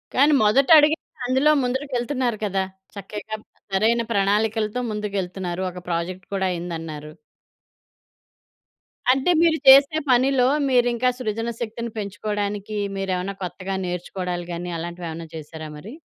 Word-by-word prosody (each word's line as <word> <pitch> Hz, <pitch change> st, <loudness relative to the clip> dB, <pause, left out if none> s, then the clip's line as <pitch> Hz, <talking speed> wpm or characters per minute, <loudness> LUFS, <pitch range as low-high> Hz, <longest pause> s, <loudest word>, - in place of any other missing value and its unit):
కానీ 290 Hz, +3 st, +5 dB
మొదట 240 Hz, +6 st, +4 dB
అడిగింది 305 Hz, +2 st, +3 dB, 0.3 s
అందులో 265 Hz, +4 st, +3 dB
ముందరకెళ్తున్నారు 250 Hz, -2 st, -1 dB
కదా! 195 Hz, -1 st, 0 dB, 0.3 s
చక్కగా 210 Hz, +2 st, -6 dB, 0.4 s
సరైన 225 Hz, +4 st, +3 dB
ప్రణాళికలతో 215 Hz, +2 st, +1 dB
ముందుకెళ్తున్నారు. 190 Hz, -4 st, -3 dB
ఒక 180 Hz, -, -9 dB
ప్రాజెక్ట్ 175 Hz, +2 st, -3 dB
కూడా 190 Hz, -1 st, 0 dB
అయిందన్నారు. 165 Hz, -3 st, -5 dB, 2.0 s
అంటే 265 Hz, +7 st, +2 dB
మీరు 330 Hz, -1 st, +4 dB
చేసే 275 Hz, +3 st, +8 dB
పనిలో 255 Hz, 0 st, +4 dB, 0.2 s
మీరు 245 Hz, -1 st, +4 dB
ఇంకా 250 Hz, +2 st, +2 dB
సృజన 225 Hz, 0 st, -2 dB
శక్తిని 235 Hz, 0 st, -4 dB
పెంచుకోవడానికి 205 Hz, 0 st, -3 dB, 0.2 s
మీరేమైనా 190 Hz, 0 st, -2 dB
కొత్తగా 185 Hz, +2 st, -4 dB
నేర్చుకోవడాలు 180 Hz, 0 st, -4 dB
గాని, 175 Hz, +1 st, -5 dB
అలాంటివి 175 Hz, +1 st, -6 dB
ఏమైనా 165 Hz, +1 st, -7 dB
చేశారా 155 Hz, 0 st, -8 dB
మరి? 200 Hz, -, -10 dB
205 Hz, 115 wpm, -23 LUFS, 180-245 Hz, 2.0 s, చేసే